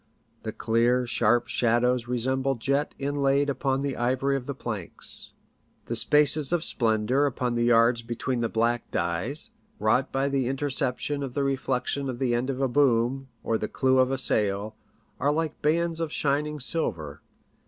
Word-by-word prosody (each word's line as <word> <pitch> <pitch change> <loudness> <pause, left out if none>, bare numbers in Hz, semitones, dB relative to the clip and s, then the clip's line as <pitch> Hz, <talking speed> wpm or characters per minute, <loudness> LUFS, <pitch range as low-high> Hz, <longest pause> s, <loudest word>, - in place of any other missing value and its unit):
The - - -5
clear, 120 +2 +1
sharp 120 0 +1
shadows 120 0 +1
resemble 130 +2 0
jet 140 +5 -1
inlaid 140 0 +1
upon 135 0 -1
the 140 -2 -2
ivory 130 +3 0
of 130 -2 -4
the 140 - -4
planks. 110 -9 +1 0.5
The - - -3
spaces 150 0 +3
of 175 -2 +1
splendour 115 +3 +1
upon 125 -2 -2
the 120 0 0
yards 115 0 +4
between 120 +2 -3
the 115 - 0
black 115 +1 0
dyes, 100 - -2 0.3
wrought 130 -9 +1
by 135 +1 0
the 135 -3 0
interception 135 +1 -1
of 135 -3 -5
the 140 - 0
reflection 135 0 -1
of 125 - -4
the 125 -2 0
end 120 +3 -1
of 135 0 -3
a 135 - +2
boom, 130 0 +1 0.2
or 110 -1 0
the 105 - -2
clew 130 -1 +2
of 130 0 +4
a 135 - -1
sail, 105 -3 0 0.4
are 140 +3 +2
like 155 0 -2
bands 165 +2 +1
of 165 -2 -2
shining 150 +1 -1
silver. 85 - -3
130 Hz, 165 wpm, -26 LUFS, 120-140 Hz, 0.5 s, yards